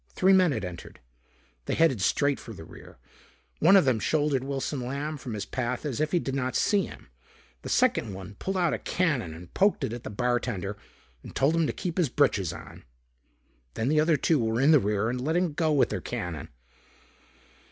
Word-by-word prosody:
Three 190 +1 +4
men 185 -3 +5
had 130 - -2
entered. 90 -2 -9 0.7
They - - 0
headed 135 -11 +3
straight 140 +8 +1
for 115 - -9
the 80 - -10
rear. - - -14 0.6
One 175 +6 +6
of 190 - +6
them 125 -4 +2
shouldered 145 +2 +1
Wilson 135 +1 -3
Lamb 140 +5 -3
from 125 -4 -6
his 105 -1 -4
path 125 +5 -3
as 145 -1 -2
if 155 0 0
he 180 - +3
did 135 -5 -2
not 130 -2 -2
see 205 -3 +2
him. - - -13 0.5
The - - -7
second 110 - +2
one 95 +1 -8
pulled 190 0 -2
out 175 -3 +2
a - - -2
cannon 145 - 0
and 85 +1 -12
poked 200 +1 +2
it 110 - -2
at 120 - -7
the - - -6
bartender 115 -3 -1 0.5
and - - -12
told 145 +5 +2
him 165 -2 +2
to - - 0
keep 180 0 -4
his 165 -7 +2
britches 120 - +2
on. - - -11 0.9
Then 115 +4 -1
the 155 +1 +3
other 155 0 +3
two 155 +2 +2
were 110 +1 0
in 140 +4 +5
the 150 - +7
rear 105 0 0
and 125 +1 -2
letting 165 +4 0
go 160 +1 +1
with 145 -3 +3
their - - -3
cannon. 85 -4 -5
135 Hz, 205 wpm, -27 LUFS, 110-160 Hz, 0.9 s, the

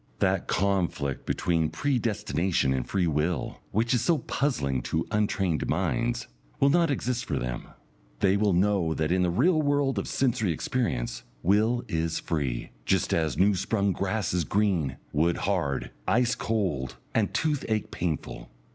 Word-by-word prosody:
That 95 -1 +1
conflict 90 -8 0
between 80 -3 +1
Predestination 105 - 0
and 65 -2 -2
Free 95 -3 +1
Will, 80 +2 -1
which 115 +4 +1
is 125 - +2
so 170 -2 +3
puzzling 75 - -1
to 80 +6 -1
untrained 95 -6 0
minds, 120 +1 0 0.3
will 140 0 +5
not 170 0 +3
exist 125 -3 -1
for - - -2
them. - - -4 0.5
They 95 0 +3
will 100 -1 +2
know 90 -3 +2
that 80 +1 0
in 90 +1 +3
the 90 - +2
real 155 - +3
world 145 -5 +1
of - - -4
sensory 120 -7 +1
experience, 65 - -2 0.2
will 110 +6 +3
is 80 0 -1
free, 70 -7 -2
just - - +1
as 80 -2 0
new 100 +2 +4
sprung 100 +2 0
grass 100 0 -1
is 90 -1 +1
green, 85 - +1 0.2
wood 85 +3 +2
hard, 85 -9 -1 0.2
ice 125 +1 +3
cold, 90 - -1 0.2
and 105 -3 +1
toothache 115 -3 -1
painful. 75 -8 -4
95 Hz, 150 wpm, -27 LUFS, 80-115 Hz, 0.5 s, will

